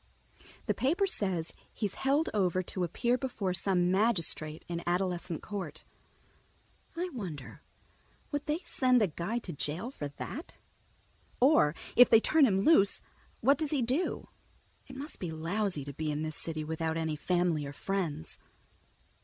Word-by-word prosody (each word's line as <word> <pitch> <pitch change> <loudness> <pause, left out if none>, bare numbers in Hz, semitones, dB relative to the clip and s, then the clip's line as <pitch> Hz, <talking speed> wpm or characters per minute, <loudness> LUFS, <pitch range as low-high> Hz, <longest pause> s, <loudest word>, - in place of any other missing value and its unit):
The - - +1
paper 340 +10 +1
says 190 - +1 0.2
he's 205 -3 -2
held 280 +4 +1
over 185 -3 +1
to 180 +1 -3
appear 240 +9 0
before 225 -8 -2
some 180 -1 +2
magistrate 170 -7 +2
in 170 -1 -3
Adolescent 175 -2 -1
Court. 205 -2 -6 1.1
I 360 +2 -1
wonder, 190 - -7 0.7
would 290 -1 -3
they 300 +1 +1
send 255 -8 +3
a - - +3
guy 170 +8 -3
to 200 -7 -5
jail 160 - -3
for 145 - -5
that? 195 - -8 0.8
Or 250 - +5 0.2
if 245 - +8
they 225 - +8
turn 300 +4 +4
him 195 -3 +2
loose, 200 -6 +4 0.4
what 275 +4 +4
does 310 -2 -1
he 280 -4 +1
do? 260 +10 -1 0.6
It 265 - -10
must 285 +4 -8
be 180 - -4
lousy 165 0 -2
to 140 - -7
be 155 +2 -3
in 150 +1 -2
this 155 -1 -2
city 155 0 -3
without 160 +1 -2
any 160 -1 -1
family 175 -1 +1
or - - -6
friends. 170 - -3
190 Hz, 155 wpm, -31 LUFS, 160-250 Hz, 1.1 s, if